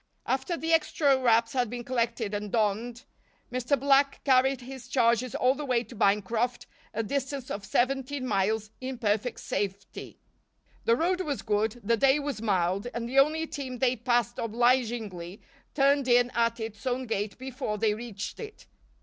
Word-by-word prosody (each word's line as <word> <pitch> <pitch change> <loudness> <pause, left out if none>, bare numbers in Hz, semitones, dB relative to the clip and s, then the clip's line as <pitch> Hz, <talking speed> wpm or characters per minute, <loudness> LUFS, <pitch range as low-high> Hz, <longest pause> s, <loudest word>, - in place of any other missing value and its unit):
After 270 +6 -1
the 325 +1 0
extra 300 -3 +3
wraps 235 -3 +3
had 250 -3 +1
been 240 +1 -5
collected 235 -3 -1
and 205 -1 -3
donned, 230 +3 -1 0.5
Mr. 255 +3 0
Black 275 0 +3
carried 265 -1 +3
his 255 0 -9
charges 245 -1 +2
all 255 +1 +3
the 295 +2 -6
way 250 -4 +1
to 245 - -13
Bancroft, 220 +4 +1 0.3
a 225 +1 -2
distance 270 +2 -3
of 200 - -4
seventeen 265 +5 0
miles, 215 0 0
in 260 0 -4
perfect 220 +1 -1
safety. 200 -1 -4 0.7
The 230 - +4
road 360 +7 +1
was 290 -6 -3
good, 215 +2 0
the 230 +3 +2
day 270 +4 +4
was 285 -6 -4
mild 195 -1 0
and 235 0 -3
the 265 +3 +3
only 310 +3 +3
team 265 -5 -6
they 255 +1 +2
passed 240 -1 0
obligingly 230 -5 0 0.4
turned 280 -1 +3
in 245 0 +4
at 230 0 +1
its 220 +1 -6
own 255 +1 -1
gate 205 -3 -3
before 260 -4 -4
they 210 0 +2
reached 215 -3 -6
it. 440 -1 -9
240 Hz, 165 wpm, -28 LUFS, 220-265 Hz, 0.7 s, The